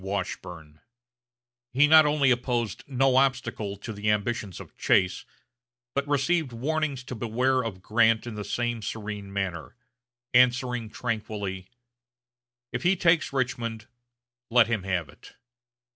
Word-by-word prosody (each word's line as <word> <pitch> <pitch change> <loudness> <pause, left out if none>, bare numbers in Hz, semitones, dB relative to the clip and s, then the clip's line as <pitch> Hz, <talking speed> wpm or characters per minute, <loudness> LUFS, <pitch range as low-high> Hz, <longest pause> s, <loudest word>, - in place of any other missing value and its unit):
Washburne. 90 -5 -5 0.9
He 140 +4 +5
not 155 0 +7
only 145 -3 +3
opposed 120 -3 -1
no 135 -1 +2
obstacle 125 -6 0
to 110 +3 -7
the 105 +1 -2
ambitions 105 -2 -1
of - - -12
Chase, 90 0 +2 0.7
but 140 +1 -1
received 145 +1 +1
warnings 140 +2 -2
to 130 - -7
beware 125 +3 0
of 95 -5 -6
Grant 110 +1 +3
in 120 - -6
the 105 -1 -5
same 120 +1 -2
serene 105 -1 -6
manner, 95 -2 -4 0.6
answering 125 -2 +3
tranquilly, 105 -5 -4 1.1
"If - - -2
he 180 +2 +3
takes 165 -2 +2
Richmond, 115 -4 -2 0.6
let 120 -1 +6
him 115 -2 -1
have 90 -4 -2
it." - - -16
115 Hz, 130 wpm, -26 LUFS, 105-130 Hz, 1.1 s, not